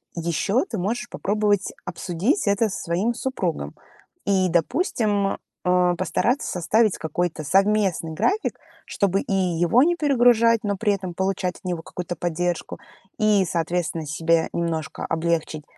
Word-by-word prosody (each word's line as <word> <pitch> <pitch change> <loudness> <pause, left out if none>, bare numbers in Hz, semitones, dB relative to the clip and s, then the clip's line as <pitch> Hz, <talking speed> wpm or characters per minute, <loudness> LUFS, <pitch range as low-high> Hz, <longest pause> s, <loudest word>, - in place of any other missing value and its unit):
Еще 170 - 0
ты 225 - -3
можешь 235 +6 -2
попробовать 205 -1 0
обсудить 185 - -1
это 200 +2 +2
со 190 - -5
своим 185 +8 0
супругом 185 - -3 0.5
и, 190 -2 +2
допустим, 205 - +1 0.3
а, 180 -1 +3
постараться 235 +8 0
составить 210 +4 +2
какой-то 160 0 -2
совместный 195 -1 +2
график, 390 - 0 0.3
чтобы 195 -1 0
и - - -3
его 180 +4 +3
не 345 +3 +3
перегружать, 240 -7 +4
но 205 -1 0
при 210 +1 +1
этом 185 -3 -4
получать 190 0 -1
от - - -28
него 175 -3 -3
какую-то 175 0 -5
поддержку, 175 +1 -2 0.4
и, 210 -3 +4
соответственно, 165 -1 -2
себе 165 +2 +1
немножко 160 -2 -3
облегчить 165 -2 -1
185 Hz, 135 wpm, -23 LUFS, 170-215 Hz, 0.5 s, перегружать